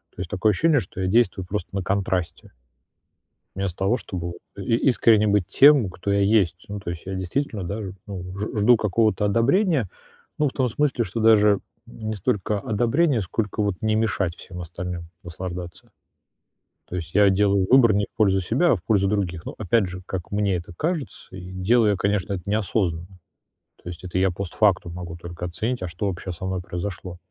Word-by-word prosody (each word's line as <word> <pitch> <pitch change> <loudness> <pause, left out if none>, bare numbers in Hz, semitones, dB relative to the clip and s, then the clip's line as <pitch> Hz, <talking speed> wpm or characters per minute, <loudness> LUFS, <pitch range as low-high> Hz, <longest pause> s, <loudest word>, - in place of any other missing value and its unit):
То - - -6
есть 90 - -5
такое 105 +2 +2
ощущение, 155 - +3
что 95 -2 -8
я 95 - 0
действую 95 -3 +2
просто 95 -2 -4
на 95 - -1
контрасте. 95 -3 -2 1.0
Вместо 95 -2 -3
того, 95 +6 +2
чтобы 90 -7 -5
вот 85 0 -6 0.3
и 115 - +2
искренне 115 -5 +4
быть 100 -3 +2
тем, 140 -8 +6
кто 90 +2 -4
я 100 0 +2
есть. 100 -5 +2
Ну, 100 0 -4
то 90 - -6
есть 85 - -7
я 95 0 -4
действительно, 100 +3 -2
да, 100 +5 -4
ж 95 - -5 0.2
ну, 95 -3 -6
ж 105 +1 -3
жду 115 +3 +6
какого-то 110 0 +1
одобрения. 130 - +2 0.5
Ну, 150 - +2
в 135 - -2
том 130 -2 +1
смысле, 130 0 0
что 115 - -5
даже 105 -2 +5 0.3
не 110 -2 -6
столько 100 +1 -1
одобрения, 120 - +1
сколько 105 +3 -2
вот 100 -2 0
не 110 0 +1
мешать 100 -6 0
всем 90 -1 -9
остальным 85 0 -6 0.2
наслаждаться. 90 0 -7 1.0
То 90 - -5
есть 85 0 -6
я 105 -1 +6
делаю 100 0 +3
выбор 125 -4 +7
не 100 0 +1
в - - -56
пользу 95 -3 +3
себя, 130 - +2
а 115 - +3
в 85 - -12
пользу 100 -1 +2
других. 90 -5 -2
Ну, - - -6
опять 110 0 +2
же, 90 0 -7
как 90 -2 -5
мне 100 -2 +1
это 85 0 -7
кажется, 150 - -4
и 90 0 -9
делаю 105 +4 +3
я, 100 - +1
конечно, 100 0 0
это 90 -3 -3
неосознанно. 95 -4 -1 0.6
То - - -9
есть 90 0 -8
это 90 0 -3
я 95 0 +3
постфактум 95 -1 0
могу 85 -1 -7
только 85 +1 -7
оценить, 110 +9 -3
а 90 - -2
что 90 +5 -4
вообще 95 -1 -4
со 85 +2 -8
мной 95 -1 -2
произошло. 90 0 -6
100 Hz, 195 wpm, -24 LUFS, 90-110 Hz, 1.0 s, выбор